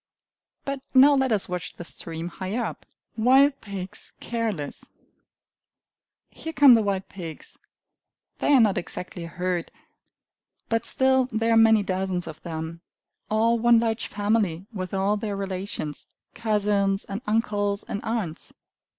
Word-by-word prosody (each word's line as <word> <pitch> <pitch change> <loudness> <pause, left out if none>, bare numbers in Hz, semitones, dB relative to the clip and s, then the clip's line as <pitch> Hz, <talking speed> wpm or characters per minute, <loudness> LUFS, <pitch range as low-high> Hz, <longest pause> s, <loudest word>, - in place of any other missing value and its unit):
But 275 -1 -3
now 275 +3 +8
let 265 -2 +2
us 210 -3 +2
watch 180 0 -5
the - - -8
stream 165 0 -5
higher 195 +7 -3
up. - - -7 0.3
Wild 270 +5 +4
Pigs 195 -3 -5
Careless 220 -11 -3 1.5
Here 320 - -7
come 280 -3 +8
the 230 - +5
wild 195 -2 -1
pigs. 165 -5 -9 0.8
They - - +2
are 270 - +7
not 210 -5 +4
exactly 180 0 -5
a - - -6
herd; 180 0 -2 1.0
but 230 0 0
still 260 -1 +3
there 225 +1 +1
are - - +4
many 225 -2 +6
dozens 185 -2 -2
of 160 -1 -9
them, 165 0 -6 0.5
all 230 +2 +2
one 235 0 +5
large 225 0 -1
family 205 -4 0
with 185 -3 -5
all 195 +2 +1
their 205 -1 -3
relations 190 -6 -4 0.3
cousins 205 -3 +1
and 200 +3 -5
uncles 205 -2 0
and 205 - -4
aunts. 215 -8 -3
205 Hz, 140 wpm, -25 LUFS, 185-230 Hz, 1.5 s, now